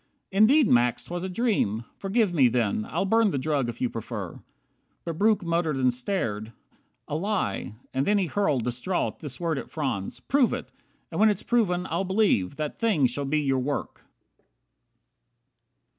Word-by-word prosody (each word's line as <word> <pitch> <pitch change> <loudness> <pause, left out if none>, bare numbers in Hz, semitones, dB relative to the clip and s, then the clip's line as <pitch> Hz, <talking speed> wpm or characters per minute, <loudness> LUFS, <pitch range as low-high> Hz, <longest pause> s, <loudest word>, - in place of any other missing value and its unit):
Indeed, 225 +8 +5
Max, 120 -2 +3
'twas 175 0 -5
a 190 - -3
dream. 180 - 0
Forgive 195 -1 0
me 140 -6 +5
then. 115 -3 0
I'll - - -1
burn 225 +2 +3
the 145 - -1
drug 140 -2 0
if 120 - -7
you 125 - +1
prefer." 110 -5 -6 0.7
But 165 -1 -4
Breuck 210 -1 +3
Muttered 170 -3 0
and 130 -2 +2
stared, 115 - -3 0.5
"A - - -3
lie." 190 - -2 0.2
And 135 +1 0
then 210 - +4
he 195 - +2
hurled, 155 - 0
Distraught, 125 +10 -2
this 140 -5 -7
word 165 -4 -1
at - - -8
Franz: 130 -11 -3
"Prove 270 -3 +2
it. - - -5 0.4
And - - -3
when 220 +1 +6
It's 205 -3 -1
proven, 185 -7 +1
I'll 170 +4 -1
believe. 190 - +1
That 150 -1 -4
thing 205 -12 +3
shall 130 +3 -1
be 150 +2 +1
your 135 -2 +1
work. 140 +3 -3
155 Hz, 170 wpm, -26 LUFS, 125-195 Hz, 0.7 s, when